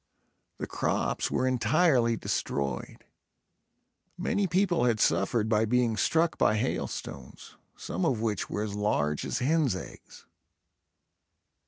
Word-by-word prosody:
The -, -, -4 dB
crops -, -, -1 dB
were 130 Hz, -, 0 dB
entirely 130 Hz, -2 st, +2 dB
destroyed. 70 Hz, -, -3 dB, 1.1 s
Many 200 Hz, -1 st, 0 dB
people 175 Hz, -5 st, +2 dB
had 115 Hz, -3 st, +2 dB
suffered 105 Hz, +3 st, +2 dB
by 110 Hz, 0 st, +2 dB
being 120 Hz, 0 st, +1 dB
struck 160 Hz, +9 st, +1 dB
by 110 Hz, -, +3 dB
hailstones, 70 Hz, -, -5 dB, 0.2 s
some 90 Hz, +2 st, -4 dB
of 120 Hz, -, +1 dB
which 110 Hz, -3 st, -2 dB
were 105 Hz, -, -2 dB
as 105 Hz, -2 st, -4 dB
large 75 Hz, -8 st, 0 dB
as -, -, -2 dB
hens 140 Hz, -, +1 dB
eggs. -, -, -10 dB
115 Hz, 120 wpm, -28 LUFS, 105-135 Hz, 1.1 s, by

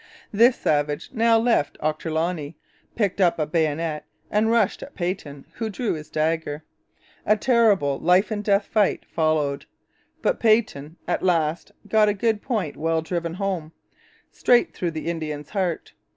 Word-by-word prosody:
This 235 Hz, +4 st, +5 dB
savage 145 Hz, -1 st, -1 dB
now 230 Hz, -1 st, +4 dB
left 225 Hz, -11 st, +1 dB
Ochterloney, 160 Hz, 0 st, -2 dB, 0.4 s
picked 200 Hz, -3 st, 0 dB
up 175 Hz, -2 st, +3 dB
a 155 Hz, -, 0 dB
bayonet 155 Hz, 0 st, -1 dB, 0.3 s
and 215 Hz, +2 st, +2 dB
rushed 230 Hz, -4 st, +2 dB
at 285 Hz, -, -10 dB
Peyton, 175 Hz, -6 st, -4 dB
who 225 Hz, -1 st, -4 dB
drew 220 Hz, +2 st, -2 dB
his 155 Hz, -2 st, -8 dB
dagger. 155 Hz, -1 st, -1 dB, 0.6 s
A 215 Hz, +1 st, +3 dB
terrible 210 Hz, -, +3 dB
life 185 Hz, +5 st, +3 dB
and 210 Hz, -1 st, -2 dB
death 200 Hz, -1 st, +2 dB
fight 210 Hz, -3 st, +1 dB
followed; 155 Hz, -3 st, 0 dB, 0.6 s
but -, -, +1 dB
Peyton 215 Hz, -10 st, +1 dB
at -, -, 0 dB
last 165 Hz, -3 st, 0 dB, 0.2 s
got 215 Hz, -1 st, +4 dB
a 205 Hz, -, 0 dB
good 220 Hz, 0 st, 0 dB
point 210 Hz, -, -2 dB
well 160 Hz, 0 st, 0 dB
driven 170 Hz, 0 st, -3 dB
home, 185 Hz, -5 st, -3 dB, 0.6 s
straight 245 Hz, -1 st, +3 dB
through 175 Hz, -, -2 dB
the 160 Hz, -1 st, -6 dB
Indian's 155 Hz, -3 st, -4 dB
heart. 185 Hz, -5 st, -2 dB
175 Hz, 150 wpm, -23 LUFS, 155-215 Hz, 0.6 s, This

